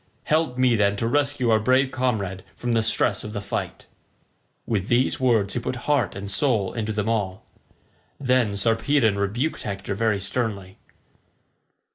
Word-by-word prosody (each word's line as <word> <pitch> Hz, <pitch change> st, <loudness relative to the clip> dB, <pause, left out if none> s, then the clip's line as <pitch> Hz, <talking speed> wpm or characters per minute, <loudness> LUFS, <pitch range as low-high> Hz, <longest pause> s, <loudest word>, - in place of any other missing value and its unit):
Help 155 Hz, -5 st, 0 dB
me, 130 Hz, -2 st, +4 dB
then, 100 Hz, -2 st, +2 dB
to 115 Hz, +3 st, -1 dB
rescue 140 Hz, -2 st, +1 dB
our 110 Hz, -, +4 dB
brave 130 Hz, +4 st, +2 dB
comrade 110 Hz, -8 st, -2 dB
from 120 Hz, -, -3 dB
the 115 Hz, -, +3 dB
stress 110 Hz, -2 st, +1 dB
of 105 Hz, -, -7 dB
the 105 Hz, -, -3 dB
fight." 100 Hz, 0 st, -5 dB, 0.8 s
With 105 Hz, -4 st, -1 dB
these 125 Hz, +2 st, +2 dB
words 115 Hz, -6 st, +2 dB
he -, -, -1 dB
put 125 Hz, -, -3 dB
heart 145 Hz, -1 st, +1 dB
and 100 Hz, +1 st, -5 dB
soul 105 Hz, -3 st, +1 dB
into 110 Hz, -2 st, -2 dB
them 105 Hz, 0 st, -2 dB
all. 100 Hz, -5 st, -2 dB, 0.7 s
Then 125 Hz, -6 st, +2 dB
Sarpedon 115 Hz, +1 st, +2 dB
rebuked 120 Hz, +10 st, -1 dB
Hector 100 Hz, -1 st, -4 dB
very 105 Hz, 0 st, +1 dB
sternly. 100 Hz, -3 st, -4 dB
110 Hz, 155 wpm, -24 LUFS, 100-125 Hz, 0.8 s, me